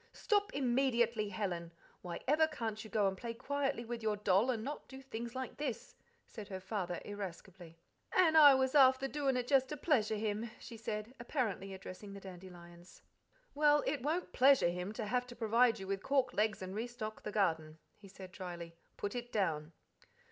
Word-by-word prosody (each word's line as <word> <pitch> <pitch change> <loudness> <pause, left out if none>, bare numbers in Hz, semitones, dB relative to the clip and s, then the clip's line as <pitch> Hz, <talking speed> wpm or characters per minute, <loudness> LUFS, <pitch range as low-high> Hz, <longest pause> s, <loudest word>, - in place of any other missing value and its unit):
"Stop 410 -3 +1
immediately, 240 -5 +1
Helen! 180 -4 -3 0.3
Why 175 -2 -6
ever 310 +3 +4
can't 225 -8 -4
you 220 - -10
go 205 -1 +2
and 190 - -1
play 230 +4 -6
quietly 275 -1 -2
with 235 0 -5
your 215 -1 0
doll, 205 +3 +3
and 225 -4 -1
not 290 +4 -6
do 265 - -10
things 240 -2 -6
like 260 -1 -5
this?" 270 -6 -4 0.3
said 215 -4 -9
her 190 -3 -5
father 185 -2 -3
irascibly. 185 -4 -8 0.3
"An' 335 -4 +4
I 290 -3 +9
was 260 0 +1
afther 265 -2 +6
doin' 275 -2 0
it 245 -1 -2
just 265 -1 +3
to 300 - -4
pleasure 245 -8 +2
him," 215 +2 -2
she 235 - -9
said, 220 +1 -5
apparently 225 -6 -2
addressing 190 +1 -9
the 200 - -8
dandelions. 175 -2 -12 0.5
"Well, 295 0 +4
it 280 -2 -1
won't 320 +7 -2
'pleasure 265 -8 +5
him' 180 +3 -4
to 215 - -4
have 250 +3 0
to 240 - -10
provide 230 +1 +3
you 190 - -6
with 195 0 -2
cork 260 +1 +1
legs 215 -1 0
and 185 0 -6
re 220 +4 -2
stock 220 -3 -6
the 210 - -5
garden," 160 -7 0 0.2
he 205 - -15
said 190 -1 -11
dryly: 175 -2 -7 0.2
"Put 205 - -3
it 245 0 -5
down." 160 -6 -1
220 Hz, 190 wpm, -35 LUFS, 190-260 Hz, 0.5 s, I